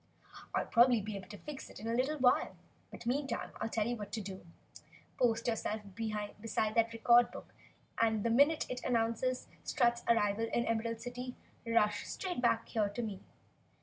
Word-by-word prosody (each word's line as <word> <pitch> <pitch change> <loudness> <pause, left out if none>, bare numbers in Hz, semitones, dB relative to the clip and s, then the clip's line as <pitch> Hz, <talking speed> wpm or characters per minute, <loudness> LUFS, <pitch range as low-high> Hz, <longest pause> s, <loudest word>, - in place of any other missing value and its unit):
I'll - - +1
probably 240 0 +5
be 210 0 -5
able 195 -1 -7
to 205 - -9
fix 295 +2 -8
it - - -11
in 220 - -6
a 230 - 0
little 265 +6 +1
while, 250 -2 +3 0.3
but - - -10
meantime 270 +1 -1
I 220 - 0
tell 220 -1 0
you 240 +2 -1
what 205 -1 -6
you 215 - -3
can 195 -1 -6
do. - - -17 0.7
Post 230 -2 +2
yourself 220 -2 -1
beside 215 0 -2
that 230 0 +3
record 235 +1 +5
book - - -11 0.5
and 220 -2 +2
the 230 - +1
minute 285 +6 +4
it 250 0 -5
announces 240 +1 0 0.2
Strut's 240 -2 +2
arrival 225 -1 +3
in 235 - +2
the - - -3
Emerald 230 0 -1
City, 250 0 -6 0.3
rush 210 -2 +2
straight 360 -9 -3
back 235 -2 +2
here 210 -3 +1
to 205 +4 -4
me!" 205 -4 -4
230 Hz, 185 wpm, -34 LUFS, 215-245 Hz, 0.7 s, probably